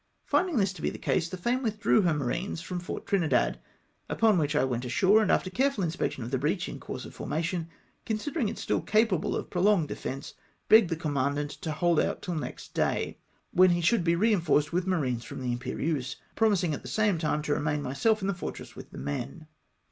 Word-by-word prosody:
Finding 360 -7 +1
this 195 -3 +2
to 170 - -11
be - - +1
the - - -7
case, 170 -2 0
the 185 - -5
Fame 240 +8 0
withdrew 220 -2 +2
her 175 -4 +2
marines 160 +7 -2
from 180 +1 -4
Fort 180 - -6
Trinidad, 175 -6 +1 0.5
upon 220 -5 +3
which 150 -1 0
I 145 - +3
went 125 -2 -1
ashore, 190 - +4
and 210 - +1
after 185 - +1
careful 265 -1 +1
inspection 160 -6 -2
of 120 - -6
the 130 - 0
breach 155 +6 0
in - - -7
course - - -6
of - - -10
formation, 165 +1 -2 0.4
considering 230 +3 -1
it - - -6
still - - -1
capable 215 -5 +2
of - - -5
prolonged 180 -3 +3
de - - -3
fence, 135 +1 -6 0.4
beo 220 - +12
o - - +3
ed 195 - -3
the 165 - -1
commandant 145 -2 -1
to 165 -4 -5
hold 170 +1 +2
out - - -1
tiU 180 - -3
next 155 - -6
day, - - -1 0.3
when 185 +1 +6
he 175 0 +2
should 195 +3 +3
be 170 0 +3
reinforced 170 -6 +2
with 180 +1 0
marines 130 -10 0
from - - -8
the 125 -1 -2
Imperieuse, 130 +3 -2 0.2
promising 195 -7 +2
at - - -4
the - - -10
same 210 -5 +1
time 150 -1 0
to 150 - -2
remam 150 -1 -1
myself 215 - +1
in - - 0
the 200 - +1
fortress 175 - -7
with - - -10
the - - -11
men. 70 - -5
170 Hz, 220 wpm, -28 LUFS, 150-200 Hz, 0.5 s, beo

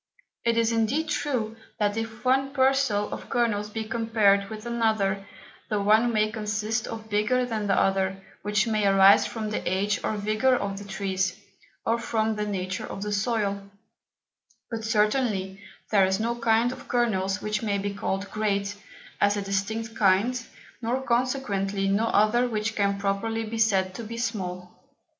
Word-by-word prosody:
It 230 0 +2
is 230 0 +3
indeed 235 +8 0
true, 230 -8 -1 0.2
that 205 -1 +1
if 225 +1 -5
one 270 +2 +2
Parcel 265 -6 +2
of - - -8
Kernels 210 -4 0
be 220 +1 -4
compared 215 -3 +2
with 215 0 -8
another, 215 -4 0 0.4
the 210 - 0
one 215 +4 +4
may 215 -1 +1
consist 215 +1 -2
of 220 -1 -7
bigger 235 +5 +2
than 220 -4 -3
the 195 - +3
other, 195 0 +1 0.2
which 210 +1 +1
may 215 -3 +1
arise 195 0 +6
from 215 -2 -4
the - - -1
Age 200 +2 0
or - - 0
Vigour 215 +5 +2
of 200 -4 -3
the 200 - -9
Trees, 190 -1 -2 0.5
or 230 +1 +1
from 220 -1 0
the 210 0 -2
Nature 185 -2 -3
of 195 - -6
the 210 - -3
Soil; 200 -2 -1 1.0
but 225 -1 -4
certainly 210 -3 0 0.3
there 195 -3 +5
is 190 +1 0
no 230 +2 0
kind 230 0 +2
of - - -10
Kernels 205 -5 +1
which 210 0 -2
may 205 -3 0
be 200 0 -3
called 200 0 -2
Great, 205 -1 -1 0.5
as 205 0 +3
a 200 - -2
distinct 220 +3 -2
Kind, 215 +6 +2 0.4
nor 240 +3 0
consequently 235 -6 0
no 200 +3 +2
other 230 +4 +3
which 220 0 -2
can 200 -1 +1
properly 200 +3 -1
be 225 +1 -5
said 190 -4 +2
to 230 - -6
be 230 +1 -7
Small. 185 -6 -3
215 Hz, 165 wpm, -26 LUFS, 200-230 Hz, 1.0 s, arise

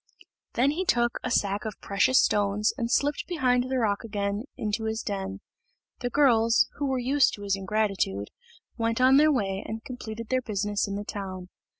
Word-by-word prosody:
Then 265 +4 +3
he 345 +5 -2
took 240 -9 +1
a - - -2
sack 200 -3 0
of 215 -2 -6
precious 200 +6 +3
stones, 205 +1 +2
and 235 -4 -2
slipped 285 +3 0
behind 255 -7 +1
the 260 - 0
rock 210 -4 0
again 205 0 -3
into 215 +1 -2
his 220 0 -2
den. 195 0 -4 0.6
The 245 - -2
girls, 230 -5 +4
who 285 - -1
were 265 -1 0
used 265 +3 +2
to 205 - -10
his 200 -1 +1
ingratitude, 195 - -1 0.5
went 230 +1 0
on 260 +1 +6
their 305 +1 +5
way, 195 -7 -1
and 225 +1 -6
completed 230 -3 -7
their 255 0 +1
business 205 -2 -1
in 200 - -4
the 205 +1 -4
town. 185 -3 -6
220 Hz, 185 wpm, -27 LUFS, 200-255 Hz, 0.6 s, on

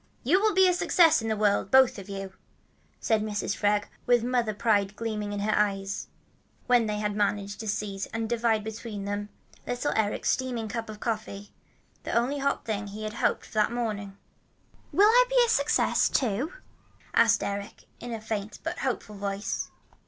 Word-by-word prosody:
"You 335 +10 +4
will 380 -4 +4
succeed 345 -4 +4
in 225 - -4
the 220 - 0
world, 205 -2 +2
both 260 -2 +5
of 195 0 -10
you," 195 -1 -6 0.7
said 220 -2 +1
Mrs. 210 -1 -2
Freg 205 0 +2 0.2
with 240 -2 +4
mother 245 -2 +1
pride 205 -3 +1
gleaming 210 -2 -3
in 205 0 -3
her 215 +1 +1
eyes, 200 -1 -1 0.6
when 245 -3 +3
they 210 0 -1
had 210 -1 -2
managed 205 -1 -1
to 220 - -6
seize 200 -1 -3
and 225 0 -3
divide 225 -2 +1
between 220 -2 -6
them 205 +1 -3 0.4
little 245 +4 -1
Eric's 215 -2 +1
steaming 245 -4 -2
cup 225 +1 -5
of 215 -1 -8
coffee, 210 -3 -4 0.5
the - - -5
only 250 +5 +1
hot 280 0 -1
thing 210 -2 -3
he 210 +2 -7
had 215 0 -4
hoped - - 0
for - - -16
that 215 0 +2
morning. 210 -5 -3 0.7
"Will 405 - +5
I - - +6
be - - +1
a - - -3
success, 285 -9 +2
too?" 255 - 0 0.6
asked 230 0 +4
Eric 200 0 -5 0.2
in 245 - -7
a 225 - -3
faint 215 -1 -4
but 330 +2 -4
hopeful 235 -5 -3
voice. 200 +1 -3
215 Hz, 175 wpm, -27 LUFS, 205-240 Hz, 0.7 s, I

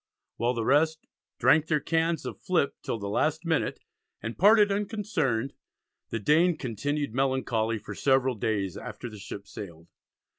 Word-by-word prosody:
While 120 +2 +1
the 115 -1 -2
rest 155 +4 +2 0.3
"drank 155 +1 +4
their 155 -2 +2
Cans 165 +2 0
of - - -6
flip 175 -6 +1
till - - -3
the 100 -2 -5
last 155 - 0
minute" 160 -2 0 0.4
and 115 +1 -5
"parted 210 +1 +6
unconcerned," 200 - -1 0.6
the - - -2
Dane 160 - +3
"continued 145 +2 -2
melancholy 125 -4 0
for - - -8
several 130 -1 +2
days" 100 -4 -1
after 115 +3 -7
the 105 - -10
ships 100 +1 -8
sailed. 85 -4 -9
135 Hz, 150 wpm, -28 LUFS, 110-160 Hz, 0.6 s, parted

